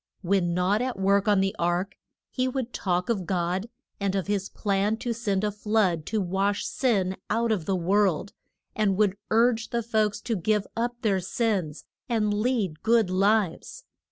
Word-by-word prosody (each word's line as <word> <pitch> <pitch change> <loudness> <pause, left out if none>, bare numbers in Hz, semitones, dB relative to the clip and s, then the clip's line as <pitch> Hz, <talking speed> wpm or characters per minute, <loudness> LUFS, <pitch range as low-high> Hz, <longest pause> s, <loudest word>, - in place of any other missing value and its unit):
When 175 -2 +1
not 190 +5 +2
at 250 -3 -2
work 200 +1 +2
on 205 -2 +4
the 195 0 0
ark, 175 +3 0 0.4
he 255 0 0
would 255 -2 -3
talk 180 -2 -1
of 195 -7 -1
God, 185 +3 -1 0.3
and 200 -1 -1
of 195 - -1
his 200 -1 -1
plan 205 +1 0
to 235 +1 -2
send 210 -4 -1
a 210 - +1
flood 205 -6 0
to 220 - 0
wash 195 +2 0
sin 195 -8 0
out 230 +2 +1
of 190 -7 -1
the 195 - 0
world, 190 0 +1 0.4
and 200 -3 +1
would 205 -2 +2
urge 230 0 +2
the 235 -1 -1
folks 215 -2 0
to 230 - -2
give 210 +2 0
up 240 +1 -2
their 200 -4 +2
sins, 185 -5 -2 0.2
and 215 -3 +1
lead 210 -7 -1
good 225 -4 +3
lives. 195 -1 +1
205 Hz, 175 wpm, -26 LUFS, 190-225 Hz, 0.4 s, on